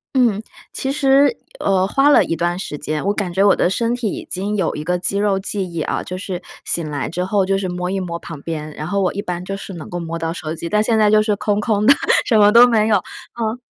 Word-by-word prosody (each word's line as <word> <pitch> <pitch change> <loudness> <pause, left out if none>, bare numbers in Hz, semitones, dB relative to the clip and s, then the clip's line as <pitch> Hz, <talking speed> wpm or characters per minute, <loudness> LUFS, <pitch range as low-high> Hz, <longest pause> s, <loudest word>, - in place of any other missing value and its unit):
嗯， 235 -6 +3 0.3
其 270 - -2
实， 280 - +3 0.2
呃， 190 -1 +2
花 275 +8 +3
了 295 - +6
一 165 - -2
段 175 +2 -1
时 165 -5 -5
间， 150 +2 -3
我 200 - +2
感 200 -4 -3
觉 190 +2 +2
我 200 - +5
的 - - +2
身 230 +5 0
体 240 -3 -2
已 - - -6
经 200 +3 -2
有 190 -6 -1
一 150 - -5
个 180 +3 0
肌 185 +2 -1
肉 200 -1 +1
记 190 -1 -4
忆 170 -1 -3
啊， - - -2
就 185 - -6
是 185 -1 -5 0.2
醒 165 -3 -2
来 145 -2 -3
之 180 +3 -2
后 195 +1 +1
就 195 +1 +1
是 190 -1 -3
摸 180 0 -3
一 195 - -1
摸 170 -2 -4
旁 165 -3 -9
边， 155 -1 -5
然 155 - -6
后 200 +2 0
我 185 - 0
一 200 - -3
般 180 -2 -4
就 195 - -4
是 195 0 -8
能 165 -3 -9
够 175 - -4
摸 165 0 -4
到 165 0 -3
手 160 -2 -5
机。 170 +1 -6
但 210 +3 +2
现 225 0 +1
在 210 -1 +4
就 215 0 +5
是 215 -1 +1
空 205 0 -1
空 210 -1 0
的， 275 - +8 0.3
什 225 -4 +3
么 205 0 +6
都 235 +2 +8
没 220 -3 +2
有， 220 - +4
嗯。 225 +4 -6
195 Hz, 295 characters per minute, -19 LUFS, 175-215 Hz, 0.3 s, 的